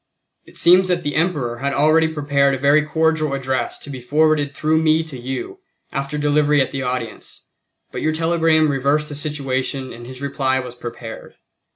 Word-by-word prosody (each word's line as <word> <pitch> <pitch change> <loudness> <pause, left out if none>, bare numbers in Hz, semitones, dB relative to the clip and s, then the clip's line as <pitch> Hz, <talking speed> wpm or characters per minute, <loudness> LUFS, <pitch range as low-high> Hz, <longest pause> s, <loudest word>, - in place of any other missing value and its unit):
It - - -12
seems 180 +2 +5
that 180 -1 0
the 145 - -2
Emperor 150 -8 -1
had 140 +1 -1
already 155 +3 +4
prepared 140 -3 +1
a - - -4
very 140 +3 +4
cordial 155 -2 +1
address 130 -2 -2
to - - -12
be 130 - -6
forwarded 150 +3 +2
through 155 +1 +1
me 160 0 +3
to 160 -4 -9
you, 130 - -6 0.3
after 140 +1 -3
delivery 150 0 +2
at 135 - +1
the 135 - -3
audience, 125 -3 -5 0.5
but - - -5
your 155 - +1
telegram 160 -1 +2
reversed 140 +3 0
the - - -6
situation 135 -2 -3
and 120 +1 -10
his 130 0 -9
reply 135 -1 0
was 125 -2 -6
prepared. 120 -2 -9
145 Hz, 180 wpm, -20 LUFS, 130-155 Hz, 0.5 s, seems